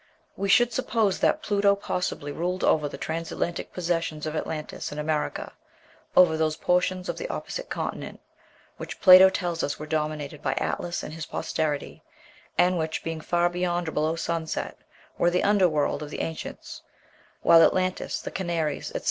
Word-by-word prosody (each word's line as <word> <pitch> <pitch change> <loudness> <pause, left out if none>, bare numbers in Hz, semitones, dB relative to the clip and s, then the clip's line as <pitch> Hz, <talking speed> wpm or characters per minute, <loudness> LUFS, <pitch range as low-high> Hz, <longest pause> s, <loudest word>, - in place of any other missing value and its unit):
'" - - -39
We 200 0 -2
should 240 +4 +5
suppose 220 -5 +1
that - - +2
Pluto 200 -1 +3
possibly 180 -6 -3
ruled 180 +4 -2
over 150 -2 +3
the - - -8
transatlantic 165 +1 -3
possessions 165 -3 -2
of 155 0 -3
Atlantis 155 -1 -4
in 150 - -7
America, 150 0 -2 0.6
over 175 -3 +7
those 155 -1 +1
"portions 180 +1 +1
of - - -3
the - - -4
opposite - - -5
continent" - - -4 0.6
which - - -7
Plato 185 0 +9
tells 175 -3 -2
us 145 - -2
were 150 - -7
dominated 150 -1 -3
by - - 0
Atlas 175 0 -2
and 155 - -7
his 160 -1 -6
posterity, 150 -3 -3 0.6
and 180 -1 +3
which, 160 0 -2
being 165 -1 -4
far 175 +2 +2
beyond 175 -1 -1
or - - -5
below 155 +2 0
sunset, 165 -1 -3 0.4
were 175 - +4
the 180 +1 +1
"under 200 -3 +4
world" 150 -1 0
of 150 - -6
the - - -4
ancients; 160 -1 -6 0.6
while 165 0 +7
Atlantis, 185 +2 +1
the - - -6
Canaries, 170 -5 -2
etc. - - -2
170 Hz, 170 wpm, -26 LUFS, 155-180 Hz, 0.6 s, Plato